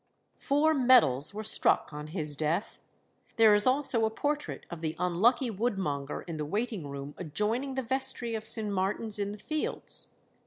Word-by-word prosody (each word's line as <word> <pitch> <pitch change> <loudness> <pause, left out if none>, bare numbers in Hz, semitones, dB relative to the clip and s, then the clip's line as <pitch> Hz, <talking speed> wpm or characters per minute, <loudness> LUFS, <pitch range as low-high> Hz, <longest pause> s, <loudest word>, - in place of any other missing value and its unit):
Four 300 +3 +2
medals 240 - +3
were 215 +2 -6
struck 205 - +1
on 150 0 -7
his 155 -3 -1
death. 160 +7 -3 0.5
There 220 -2 +5
is 205 +2 +3
also 255 -3 +4
a 220 - +2
portrait 290 +6 -4
of 170 -2 -7
the 160 -1 -3
unlucky 210 +8 +1
woodmonger 190 - -3
in 165 -3 -6
the 150 - -3
waiting 205 -1 -3
room 140 +1 -8
adjoining 215 - -2
the 265 - -2
Vestry 260 -1 0
of 220 0 -5
St. 220 -2 +5
Martin's 205 +3 -1
in 200 0 -2
the 210 - -8
Fields. 310 +8 0
210 Hz, 165 wpm, -29 LUFS, 160-245 Hz, 0.5 s, There